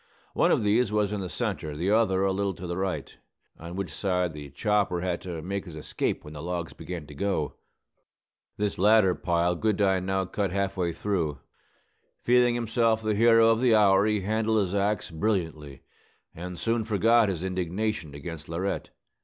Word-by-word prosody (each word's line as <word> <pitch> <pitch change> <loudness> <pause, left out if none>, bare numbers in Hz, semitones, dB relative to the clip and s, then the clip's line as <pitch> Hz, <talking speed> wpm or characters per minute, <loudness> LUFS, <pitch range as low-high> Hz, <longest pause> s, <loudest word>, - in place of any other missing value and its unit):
One - - +3
of - - +2
these 105 +2 +2
was 105 -1 +1
in 105 - -2
the 90 - -4
centre, 75 -1 -3
the 90 +5 0
other 105 -4 +3
a 95 - +2
little 100 0 -1
to 90 - -8
the 85 0 -3
right, 95 0 -3 0.4
on 85 +2 -8
which 95 -6 -4
side 90 -3 -1
the 75 -1 -8
chopper 95 +4 0
had 90 -1 -2
to 85 -4 -6
make 100 +2 -3
his 85 -4 -9
escape 75 - -2
when 75 - -9
the 75 - -7
logs 85 0 -4
began 85 -4 -7
to 75 - -12
go. 80 -1 -1 1.0
This 105 -3 -2
latter 105 -1 +5
pile 85 0 +1
Goodine 95 -2 +1
now 95 0 0
cut 100 +1 -2
half 100 0 -1
way 90 -3 0
through. 85 -6 -2 0.9
Feeling 120 0 +4
himself 115 -1 +1
the 110 0 +1
hero 115 +1 +5
of 115 +1 +2
the 120 -3 +5
hour, 100 -1 +5
he 105 -2 +1
handled 110 +2 0
his 100 -3 0
axe 100 -1 0
brilliantly, 80 -6 -2 0.5
and 90 +1 -7
soon 115 +2 0
forgot 115 +1 +3
his 90 -2 -3
indignation 95 -2 -2
against 75 +1 -8
Laurette. 90 +4 -3
95 Hz, 180 wpm, -27 LUFS, 85-105 Hz, 1.0 s, latter